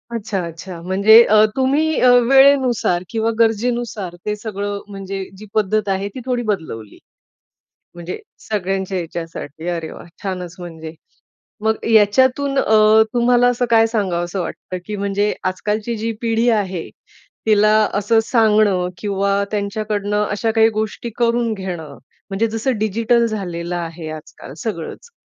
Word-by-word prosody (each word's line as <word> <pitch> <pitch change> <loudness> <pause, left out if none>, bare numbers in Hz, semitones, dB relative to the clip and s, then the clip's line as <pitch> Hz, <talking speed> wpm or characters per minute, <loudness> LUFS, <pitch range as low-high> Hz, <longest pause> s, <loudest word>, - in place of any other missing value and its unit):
अच्छा, 210 -3 -3
अच्छा. 170 +1 -9
म्हणजे 200 +6 +6
अ, 215 0 +5
तुम्ही 290 +4 +1
अ, 250 - +5 0.2
वेळेनुसार 265 -9 +4
किंवा 225 0 0
गरजेनुसार 225 -4 0
ते 210 0 -1
सगळं 205 -1 -4
म्हणजे 195 -1 -6
जी 215 - -11
पद्धत 215 0 +1
आहे 195 +1 -1
ती 255 - -9
थोडी 250 -2 -1
बदलवली. 115 - -6 1.0
म्हणजे 175 +1 -6 0.3
सगळ्यांच्या 195 -2 -2
ह्याच्यासाठी. 165 -2 -6
अरे 165 -2 -3
वाह! - - -11 0.2
छानच 180 -2 -4
म्हणजे. 160 -2 -8 0.7
मग 220 0 0
याच्यातून 260 +6 +3
अ, 215 0 +5
तुम्हाला 245 0 +4
असं 245 0 +1
काय 225 -1 +5
सांगावसं 185 -4 -2
वाटतं, 185 +1 -6
की 210 - -4
म्हणजे 200 +1 0
आज-कालची 210 +5 -2
जी 225 +1 -2
पिढी 230 +1 +1
आहे, 185 -4 -4 0.6
तिला 215 0 +4 0.2
असं 210 +3 +2
सांगणं 215 -6 +3
किंवा 200 0 0
त्यांच्याकडनं 210 0 -1
अशा 210 +2 -1
काही 225 0 +4
गोष्टी 220 +2 -3
करून 235 -1 +1
घेणं, 175 -8 -6 0.3
म्हणजे 200 +4 0
जसं 225 +3 -2
डिजिटल 225 +3 +1
झालेलं 175 -6 -4
आहे 165 -2 -5
आज-काल 155 -3 -10
सगळंच, 215 - -5
210 Hz, 135 wpm, -19 LUFS, 185-225 Hz, 1.0 s, म्हणजे